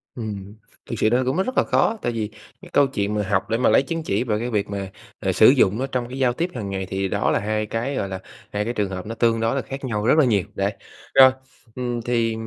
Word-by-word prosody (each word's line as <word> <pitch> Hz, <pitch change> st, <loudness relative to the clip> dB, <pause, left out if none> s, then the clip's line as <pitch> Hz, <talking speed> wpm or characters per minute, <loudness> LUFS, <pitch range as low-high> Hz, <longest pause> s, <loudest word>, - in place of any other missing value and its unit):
Ừm, 105 Hz, -3 st, -6 dB, 0.3 s
thực -, -, -2 dB
sự 110 Hz, -, +3 dB
nó 125 Hz, +3 st, +2 dB
cũng 130 Hz, -, 0 dB
mất 190 Hz, +2 st, +1 dB
rất 255 Hz, -, -4 dB
là -, -, +5 dB
khó, 225 Hz, -, +2 dB
tại 120 Hz, -, -1 dB
vì 110 Hz, -3 st, -3 dB, 0.3 s
cái -, -, -12 dB
câu 145 Hz, -1 st, +5 dB
chuyện 105 Hz, -6 st, -2 dB
mà 105 Hz, -, 0 dB
học -, -, 0 dB
để 115 Hz, -, +1 dB
mà 125 Hz, -, +3 dB
lấy -, -, +5 dB
chứng 165 Hz, +4 st, -4 dB
chỉ 100 Hz, -5 st, 0 dB
về 110 Hz, -4 st, -1 dB
cái 120 Hz, +2 st, -3 dB
việc 105 Hz, -3 st, 0 dB
mà, 100 Hz, -1 st, -4 dB, 0.3 s
à, -, -, 0 dB
sử -, -, +6 dB
dụng 100 Hz, +4 st, +3 dB
nó 135 Hz, -, -1 dB
trong 125 Hz, -3 st, -2 dB
cái 130 Hz, -, -6 dB
giao 125 Hz, -2 st, +3 dB
tiếp 170 Hz, +8 st, -1 dB
hàng 105 Hz, -5 st, -4 dB
ngày 95 Hz, -1 st, -3 dB
thì 95 Hz, +1 st, -2 dB
đó -, -, 0 dB
là -, -, +2 dB
hai 110 Hz, +1 st, -1 dB
cái, 115 Hz, +6 st, -3 dB
gọi 100 Hz, -, -2 dB
là, 95 Hz, -1 st, -4 dB, 0.3 s
hai 105 Hz, 0 st, -1 dB
cái 120 Hz, -, -2 dB
trường 105 Hz, -4 st, -1 dB
hợp 95 Hz, 0 st, -5 dB
nó 115 Hz, +2 st, -5 dB
tương 115 Hz, -1 st, +2 dB
đối 115 Hz, +3 st, +1 dB
là 135 Hz, -, 0 dB
khác 135 Hz, +3 st, -7 dB
nhau 105 Hz, -4 st, -2 dB
rất 140 Hz, -, +4 dB
là 155 Hz, -, +6 dB
nhiều, 105 Hz, -6 st, +2 dB
đấy. -, -, 0 dB, 0.4 s
Rồi, 130 Hz, -1 st, +8 dB, 0.4 s
ừm, 120 Hz, -2 st, -2 dB
thì, 115 Hz, -1 st, 0 dB
115 Hz, 285 wpm, -23 LUFS, 105-130 Hz, 0.4 s, Rồi